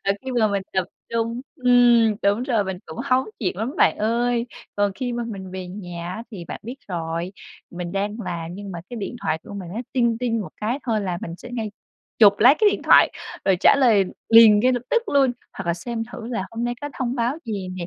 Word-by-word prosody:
Rồi 195 0 +2
khi 265 - -4
mà 225 -3 +3
mình 200 -1 -1
tập 190 -1 +1 0.3
trung 230 +1 -1 0.2
ừm, 240 -3 +5
đúng 205 +4 +2
rồi, 230 -6 +1
mình 190 -1 -4
cũng - - -9
hóng 260 -1 +2
chuyện 185 -5 -2
lắm 230 +7 -3
bạn - - +3
ơi. 235 +2 +1 0.3
Còn 205 -1 +2
khi 250 0 -3
mà 240 0 -2
mình 195 -4 -7
về 185 0 -6
nhà 180 -2 -6
á 220 - -6
thì 190 -6 -8
bạn - - -7
biết 245 +5 -7
rồi, 170 0 -3 0.4
mình 175 0 -6
đang 205 +2 -2
làm 165 -1 -4
nhưng 200 0 -7
mà 170 - -6
cái 245 - -6
điện 225 +2 -5
thoại 160 0 0
của 205 - -10
mình 190 -3 -6
nó 225 - -2
"ting 235 -3 +2
ting" 230 -2 0
một 200 - -5
cái 230 +6 -1
thôi 220 -3 +1
là 180 -3 -2
mình 165 - -5
sẽ 245 - -11
ngay 225 -3 -3 0.5
chụp 205 -3 +8
lấy 255 +6 +7
cái 420 -2 +5
điện - - -3
thoại, - - +6 0.3
rồi 190 -2 +3
trả - - +7
lời 225 -7 +5 0.2
liền 225 -2 +8
ngay 255 +3 +3
lập 245 -2 -1
tức 470 - +3
luôn, 275 -3 +3 0.2
hoặc 195 - -7
là 170 - +1
xem 225 +6 -4
thử 235 -3 -7
là 225 -6 -3
hôm 230 +1 -3
nay 240 0 -1
có 290 - -4
thông 250 -1 -1
báo 245 +2 0
gì 200 -4 -4
nè. 175 - -4
220 Hz, 240 wpm, -23 LUFS, 190-240 Hz, 0.5 s, chụp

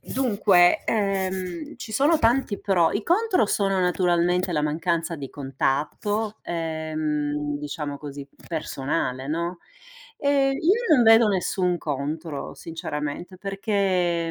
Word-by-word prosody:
Dunque, 200 -8 +3
ehm, 190 -5 -2
ci 220 - -8
sono 290 +8 +3
tanti 230 -3 +2
pro 175 -5 +2
i 205 - -1
contro 370 - +2
sono 195 -2 +1
naturalmente 180 0 +1
la 150 -2 0
mancanza 165 +2 -1
di 140 -3 -7
contatto, 150 - -2
ehm, 155 -3 -2
diciamo 145 -1 -5
così 140 -1 -8 0.2
personale, 135 -4 -2
no, 170 +3 -2 0.6
e 280 -1 +2
io 360 - +3
non 250 - +5
vedo 225 -1 +7
nessun 185 -2 0
contro 150 0 -4
sinceramente 160 +2 -5
perché 190 -4 0
175 Hz, 115 wpm, -24 LUFS, 150-205 Hz, 0.6 s, vedo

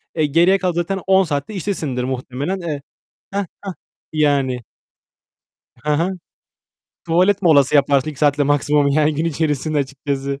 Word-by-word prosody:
E, 155 -2 +2
geriye 170 +6 +4
kalan 185 -2 -1
zaten 175 +3 -2
10 190 0 +5
saat 145 -5 -2
de 215 - -7
iştesindir 160 -10 -3
muhtemelen, 130 +7 -3
eee. 155 -5 -4 0.5
Heh, 200 - 0 0.2
heh. 195 -2 -5 0.4
Yani 140 -5 +1 1.2
Hı 150 - +1
hı. 165 +5 +1 1.0
Tuvalet 185 +4 +2
molası 145 -6 +4
yaparsın 140 +1 +3
2 145 - -12
saat 145 -1 +2
de - - +3
maksimum, 145 0 +2
yani, 150 +2 +2
gün 155 +3 -1
içerisinde 155 -1 -1
açıkçası. 140 0 -3
150 Hz, 150 wpm, -19 LUFS, 140-170 Hz, 1.2 s, 10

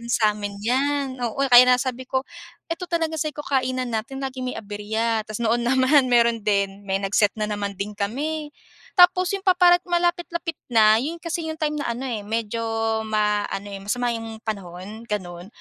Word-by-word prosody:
rin 235 - -10
samin 210 -2 +1
'yan, 270 +3 0
oo, 240 +1 -2
kaya 245 0 +10
nga 250 0 +6
sabi 260 0 -3
ko, 260 0 0 0.5
ito 335 +2 -3
talaga 330 -2 -1
sabi 305 +1 -1
ko, - - -4
"Kainan 255 -2 0
natin 230 +5 -3
laging 260 -1 -4
may - - -7
aberya." 220 +2 -2
Tapos 215 -1 -6
noon 235 +2 +2
naman, 260 +1 +4
meron 235 -1 +3
din. 200 -1 0
May 195 0 0
nag-set 200 +1 +2
na 210 - +1
naman 205 -1 -3
din 210 +1 -3
kami. 295 +9 -3 0.5
Tapos 360 0 +6
yung 390 - -11
paparat 355 -1 +5
malapit-lapit 345 -1 -1 0.2
na, 215 -1 +6
yun 320 +7 -4
kasi 335 -1 -3
yung 315 - -4
time 300 -1 0
na 290 - -3
ano 245 - -6
eh, 215 -4 -4
medyo, 225 +1 -2 0.5
ma 210 -1 +1
ano 200 +1 -5
eh, 200 - -6
masama 225 +5 -2
yung 225 -1 -6
panahon, 200 +1 -6
ganon. 180 -5 -5
235 Hz, 185 wpm, -23 LUFS, 210-290 Hz, 0.5 s, kaya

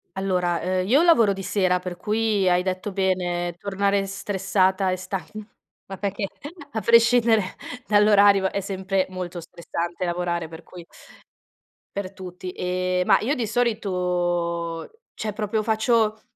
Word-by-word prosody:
Allora, 180 -3 0
ehm, 185 +1 -1
io 270 +8 +5
lavoro 235 - +5
di 195 0 -7
sera 185 -1 +1
per 180 -1 -6
cui 210 0 +1
hai 180 0 +2
detto 185 +2 -3
bene, 180 -2 -1
tornare 200 +1 0
stressata 195 -1 0
e - - 0
stan 185 0 -4 0.7
ma 195 - -6
perché 200 +1 -2 0.5
a 220 - -2
prescindere 230 0 +5 0.5
dall'orario 205 -2 +5
è - - -1
sempre 190 0 -1
molto 180 -1 -6
stressante 170 +1 -5
lavorare, 175 -1 -2
per 160 +1 -11
cui 175 0 -12 1.1
per 200 -1 -4
tutti. 180 -1 -8
Ehm, 180 0 -1
ma - - +6
io 270 +7 0
di 235 -4 -2
solito 175 -7 -1 0.2
cioè 215 -1 -4
proprio 215 +1 -1
faccio: 220 0 +1
190 Hz, 135 wpm, -24 LUFS, 180-210 Hz, 1.1 s, ma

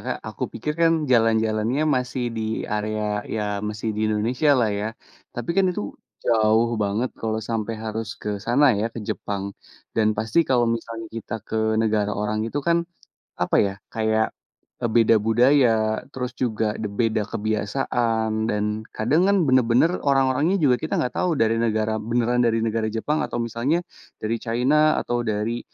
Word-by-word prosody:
Kak, - - -2
aku - - -8
pikir 150 - -3
kan, 165 -2 +3
jalan-jalannya 115 +1 +2
masih 125 0 -2
di 110 0 -2
area, 105 0 -2
ya 105 -2 -2
masih 110 +1 -3
di 105 - -4
Indonesia 115 +8 0
lah 115 -4 +2
ya. 100 +1 -2 0.5
Tapi 120 +4 -3
kan 195 -1 +4
itu 105 - -3 0.3
jauh 110 +1 +3
banget 105 +5 -1
kalau 110 -1 -1
sampai 115 0 -2
harus 110 +1 -3 0.2
ke - - -4
sana 125 +6 +4
ya, 110 - 0
ke 115 - -8
Jepang, 100 -1 -3 0.4
dan 110 -1 +3
pasti 110 +8 0
kalau 125 -2 +3
misalnya 115 0 -6
kita 115 -1 -6
ke 110 0 0
negara 105 -2 0
orang 105 +1 -1
itu 140 - -3
kan, 170 0 +3 0.6
apa - - +2
ya, 100 - -3 0.2
kayak, 110 0 +1 0.6
e - - +4
beda 115 -1 +5
budaya, 125 +3 +5 0.4
terus 125 -1 -4
juga 110 -3 0 0.2
de 105 - -2
beda 110 +1 0
kebiasaan, 110 0 -1
dan 105 -2 0 0.3
kadang 135 +10 +2
kan 200 - +4
benar-benar 130 +4 +4 0.2
orang-orangnya 140 +7 +3
juga 125 -3 +5
kita 160 - -2
nggak 125 - 0
tahu 180 - +1
dari 115 -2 +2
negara 110 -1 0
beneran 120 +2 0
dari 115 -1 +1
negara 110 -1 0
Jepang, 145 +8 -1
atau - - -4
misalnya 125 +9 -1 0.4
dari 110 +2 0
China 135 +7 +2
atau 120 0 -1
dari, 110 +2 -1
115 Hz, 160 wpm, -23 LUFS, 110-125 Hz, 0.6 s, beda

